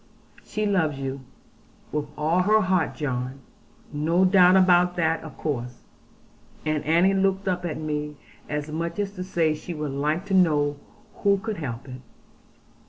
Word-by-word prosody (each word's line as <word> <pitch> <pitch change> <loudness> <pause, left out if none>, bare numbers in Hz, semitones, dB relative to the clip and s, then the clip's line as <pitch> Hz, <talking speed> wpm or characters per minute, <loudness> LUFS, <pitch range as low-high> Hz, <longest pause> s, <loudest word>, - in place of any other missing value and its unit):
'She 215 0 -3
loves 170 -8 +1
you, 135 0 -4 0.7
with 150 -1 -2
all 155 +4 +1
her 215 +4 +4
heart, 185 -3 +1
John. 130 -2 -3 0.6
No 165 +5 +2
doubt 185 -1 +6
about 180 -1 +4
that 165 -1 +1
of 155 -4 -10
course.' 125 -5 -4 0.8
And 155 -1 0
Annie 170 +5 +4
looked 195 0 +1
up 180 -1 -1
at 165 - -3
me, 150 -1 -3 0.3
as 150 +1 -3
much 165 +2 -3
as 205 -1 -1
to 185 -2 -6
say 170 -4 +1
she 160 +3 -7
would 150 -2 -3
like 150 +6 -1
to 200 - -4
know 150 -6 +3 0.4
who 200 -1 +3
could 215 +1 -4
help 130 -5 -5
it. 130 -1 -9
160 Hz, 160 wpm, -25 LUFS, 150-185 Hz, 0.8 s, doubt